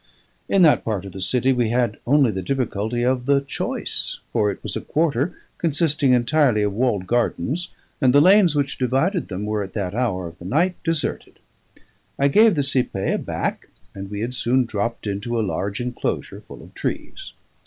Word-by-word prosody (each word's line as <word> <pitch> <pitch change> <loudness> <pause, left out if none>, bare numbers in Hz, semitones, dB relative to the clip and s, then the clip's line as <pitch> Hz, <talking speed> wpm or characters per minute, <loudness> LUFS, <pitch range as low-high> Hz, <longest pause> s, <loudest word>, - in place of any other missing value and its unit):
In 195 -2 +4
that 155 - +5
part 105 -4 -2
of 100 - -8
the 95 +1 -8
city 125 +6 +2
we 120 -3 +1
had 120 -2 0
only 140 -3 +4
the 95 -2 -3
difficulty 120 0 -1
of 125 0 0
the 140 0 +4
choice, 140 0 -4
for 105 -3 +2
it 100 - -4
was - - -5
a - - -2
quarter 155 +1 0 0.2
consisting 150 -4 +1
entirely 125 -2 +3
of 105 -1 0
walled 105 -4 0
gardens, 125 - -1 0.3
and 130 -2 +5
the 140 - +6
lanes 185 0 +5
which 140 -1 -1
divided 135 - +1
them 100 +1 -4
were 105 0 -1
at 95 -1 -6
that 100 -4 -3
hour 105 -7 -1
of 85 +1 -10
the 85 - -11
night 165 - +2
deserted. 165 -2 -3 0.8
I 140 +1 +3
gave 215 +6 +5
the 145 - +1
cipaye 125 -8 -1
a - - 0
back, - - -3 0.3
and 95 0 -7
we 105 0 -5
had 120 +2 -3
soon 125 +1 +2
dropped 115 +1 -3
into 105 +4 -2
a 110 - +1
large 100 +1 -3
enclosure 120 0 -3
full - - -12
of - - -15
trees. - - -5
125 Hz, 190 wpm, -22 LUFS, 105-140 Hz, 0.8 s, the